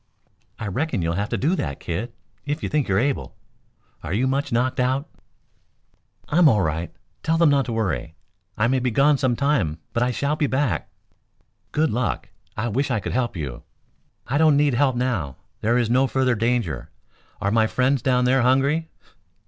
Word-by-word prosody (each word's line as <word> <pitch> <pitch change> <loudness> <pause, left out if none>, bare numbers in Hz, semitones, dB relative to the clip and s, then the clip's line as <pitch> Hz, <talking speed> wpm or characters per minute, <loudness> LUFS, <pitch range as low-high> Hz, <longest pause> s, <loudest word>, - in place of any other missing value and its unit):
"I - - -5
reckon 115 - -1
you'll 85 0 0
have 100 +5 -2
to - - -1
do 160 +8 +1
that, 70 - -3
kid, 100 +9 -4 0.3
if 145 +2 -3
you - - -1
think 150 -3 0
you're 95 - +1
able. 135 +5 -1 0.7
Are 85 - -4
you 120 +6 +1
much 140 +2 -1
knocked 125 +3 0
out?" 130 +4 +1 1.2
"I'm 165 0 +5
all 105 -6 +3
right. 80 +2 -2 0.3
Tell 165 +1 +1
them 165 -3 +5
not 140 -2 +2
to - - -4
worry. 80 - -2 0.4
I 110 +2 +2
may 130 +2 +2
be 125 0 0
gone 140 +4 +3
some 130 -2 +1
time, 125 - +1 0.2
but 120 - 0
I 125 - +2
shall 140 +4 0
be 150 -1 0
back." 130 - -1 0.8
"Good 155 +1 +1
luck! 120 -2 -2 0.3
I 110 +2 -1
wish 130 +6 -1
I 115 -4 +1
could - - -4
help 120 -6 -1
you." 70 -6 -5 0.6
"I 140 +4 0
don't 155 -3 +5
need 145 -2 +3
help 130 +1 +2
now. 120 - -2 0.2
There 115 +3 +2
is 120 -2 +2
no 130 +4 +3
further 130 -1 +1
danger. 115 - -1 0.5
Are 100 - 0
my 110 0 +3
friends 130 +3 +1
down 125 0 +2
there 130 +1 +3
hungry?" 140 +6 +2
125 Hz, 190 wpm, -23 LUFS, 110-140 Hz, 1.2 s, I'm